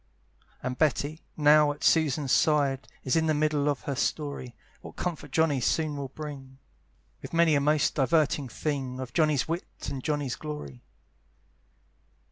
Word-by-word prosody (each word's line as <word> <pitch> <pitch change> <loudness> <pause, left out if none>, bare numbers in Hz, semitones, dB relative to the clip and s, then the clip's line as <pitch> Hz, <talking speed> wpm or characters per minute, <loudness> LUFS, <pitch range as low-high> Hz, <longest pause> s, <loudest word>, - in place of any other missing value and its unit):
And 125 0 -3
Betty, 155 +1 0 0.2
now 150 0 +5
at 145 - -9
Susan's 150 -4 +2
side, 140 -4 +2 0.2
Is 130 - +1
in 160 0 +2
the 155 - +2
middle 150 -1 +1
of 145 - -1
her 140 - -3
story, 140 -3 -3 0.3
What - - -11
comfort 160 -4 -4
Johnny 145 -2 +2
soon 155 +4 0
will 140 -1 -4
bring, 135 -2 -9 0.6
With - - -9
many 165 -1 +4
a 140 - +3
most 150 0 +2
diverting 145 -1 +1
thing, 135 -1 -3
Of 130 -2 -6
Johnny's 155 -4 +2
wit 170 +2 -5
and 135 -2 -5
Johnny's 145 -4 -1
glory. 110 - -7
145 Hz, 150 wpm, -28 LUFS, 135-155 Hz, 0.6 s, now